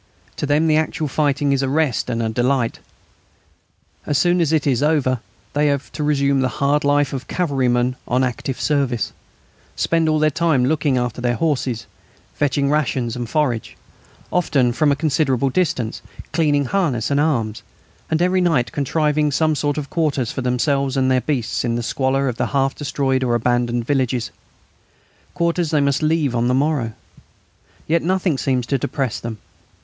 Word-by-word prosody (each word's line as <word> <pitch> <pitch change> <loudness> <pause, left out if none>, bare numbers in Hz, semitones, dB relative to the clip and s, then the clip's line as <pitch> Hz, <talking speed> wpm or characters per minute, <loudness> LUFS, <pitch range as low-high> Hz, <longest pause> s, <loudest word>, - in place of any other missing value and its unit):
To 145 - -2
them 150 +3 +2
the 155 -1 +3
actual 155 0 -1
fighting 145 0 +1
is 135 - +1
a 135 - 0
rest 145 -4 0
and 115 -1 -1
a 110 - 0
delight. 120 +1 0 1.3
As 145 - +1
soon 175 +4 +3
as 160 -2 +1
it 155 -3 +1
is 135 -4 +1
over 145 -5 +2 0.3
they 150 +1 +2
have 140 -1 -1
to 150 - -4
resume 140 -2 +2
the 130 - +2
hard 145 +2 +2
life 145 -1 +2
of 130 -1 -5
cavalrymen 130 -7 0
on 125 +2 +1
active 125 +1 -3
service, 135 -7 0 0.6
spend 165 -1 +1
all 155 - +2
their 155 0 +2
time 150 -5 +2
looking 150 -1 +1
after 125 0 -2
their 120 0 +1
horses, 130 -7 -1 0.5
fetching 140 0 0
rations 130 -6 0
and 120 -2 -5
forage, 125 -7 -1 0.6
often 135 -8 +2
from 150 +3 +2
a - - +3
considerable 140 -3 +1
distance, 145 -9 -1 0.3
cleaning 150 -3 +2
harness 145 - 0
and 140 - +2
arms, 120 -8 0 0.5
and 160 +2 +1
every 185 +1 +2
night 160 -9 +1
contriving 150 +1 +1
some 155 +2 +2
sort 145 0 -1
of 145 -2 -5
quarters 150 -9 0
for - - -4
themselves 135 +2 0
and 130 0 +2
their 130 -1 +3
beasts 130 -6 -1
in 120 -1 0
the 120 - -2
squalor 135 +2 0
of 120 -3 -3
half 135 -1 +1
destroyed 135 -2 -1
or 120 -2 +1
abandoned 120 0 0
villages, 130 -3 0 1.0
quarters 170 -1 0
they 150 - +2
must 140 0 +1
leave 155 -4 +1
on 120 0 +1
the 125 - +2
morrow. 135 -5 0 0.9
Yet 165 +1 +1
nothing 180 -4 0
seems 130 -3 0
to 135 +2 0
depress 130 -1 -2
them. 115 -2 -6
140 Hz, 170 wpm, -20 LUFS, 125-155 Hz, 1.3 s, the